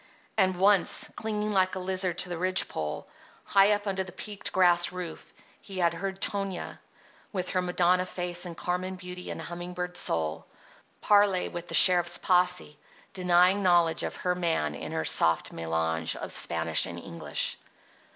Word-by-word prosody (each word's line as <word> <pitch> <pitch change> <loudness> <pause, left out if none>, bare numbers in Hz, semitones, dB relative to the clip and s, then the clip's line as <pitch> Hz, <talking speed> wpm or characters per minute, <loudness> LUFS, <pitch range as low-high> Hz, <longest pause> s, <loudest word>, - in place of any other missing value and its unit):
And 190 -3 +2
once, 200 0 +2
clinging 215 -1 -3
like 185 -2 +1
a - - -4
lizard 185 -1 +1
to 180 - +2
the 175 - -4
ridge 185 +1 +3
pole, 75 -1 -5 0.4
high 200 +1 +4
up 205 0 -3
under 190 -1 -2
the 185 - -11
peaked 205 +2 -5
grass 175 -2 +3
roof, 180 -3 -8 0.3
he 195 -2 -9
had 170 -2 +2
heard 190 +3 -5
Tonia, 195 -3 -3 0.5
with 185 -3 -3
her 185 - 0
Madonna 180 0 +1
face 175 0 -1
and 170 -2 -9
Carmen 185 +1 -3
beauty 180 -1 -9
and - - -6
humming 175 +1 -7
bird 180 0 -5
soul, 80 - -3 0.5
parley 205 -3 +3
with 175 0 -7
the - - -1
sheriff's 175 -2 +6
posse, 180 -4 0 0.3
denying 180 +1 +3
knowledge 175 -3 +3
of - - -4
her 180 - -1
man 165 - -1
in - - -7
her - - -2
soft 80 0 +2
mélange 80 0 -2
of - - -7
Spanish 80 0 +1
and 85 -1 -7
English. 85 -1 -3
180 Hz, 165 wpm, -27 LUFS, 170-190 Hz, 0.5 s, sheriff's